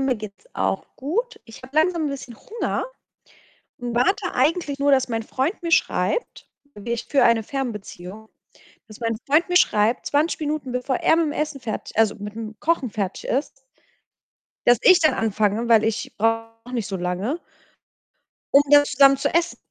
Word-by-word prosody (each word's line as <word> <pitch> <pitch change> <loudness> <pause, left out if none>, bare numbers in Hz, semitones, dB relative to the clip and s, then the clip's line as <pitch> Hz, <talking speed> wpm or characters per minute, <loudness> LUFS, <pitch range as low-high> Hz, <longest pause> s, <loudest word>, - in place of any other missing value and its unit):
mir 265 -3 +1
geht's 215 - -10
auch - - -1
gut. 450 - -3
Ich 225 +1 -14
habe 265 +3 -12
langsam 320 -1 +2
'n - - -1
bisschen 270 -4 -7
Hunger 450 - -4 0.9
und 240 -1 -5
warte 360 +12 +1
eigentlich 305 -4 0
nur, 285 0 +3
dass 260 -1 +3
mein 225 -2 -2
Freund 275 - -2
mir 335 - -3
schreibt. 485 +8 0 0.3
Ich 235 0 -3
führe 280 - +2
eine 230 -1 +4
Fernbeziehung, 220 -5 -6 0.6
dass 215 -2 -13
mein 230 -1 -1
Freund 305 +5 +3
mir 355 0 +4
schreibt, 215 -4 +2
20 300 +4 +1
Minuten 300 -3 -3
bevor 250 +1 -1
er - - +3
mit'm 325 -3 0
Essen 300 -2 -3
fertig 220 -3 -6
also 220 -2 +3
mit'm 215 +2 -7
Kochen 325 -6 0
fertig 200 -3 -4
ist 275 +4 0 1.2
dass 245 -1 +6
ich 370 -2 +7
dann 310 - +3
anfange, 215 +1 0
weil 220 -2 +5
ich 220 -1 -2
brauche 225 +2 -2
nicht 235 -5 -2
so 195 - -3
lange 185 - -2 1.2
um 280 - +8
dann 290 0 +7
zusammen 275 0 +5
zu 270 - -1
essen. 340 0 +1
250 Hz, 165 wpm, -23 LUFS, 225-300 Hz, 1.2 s, um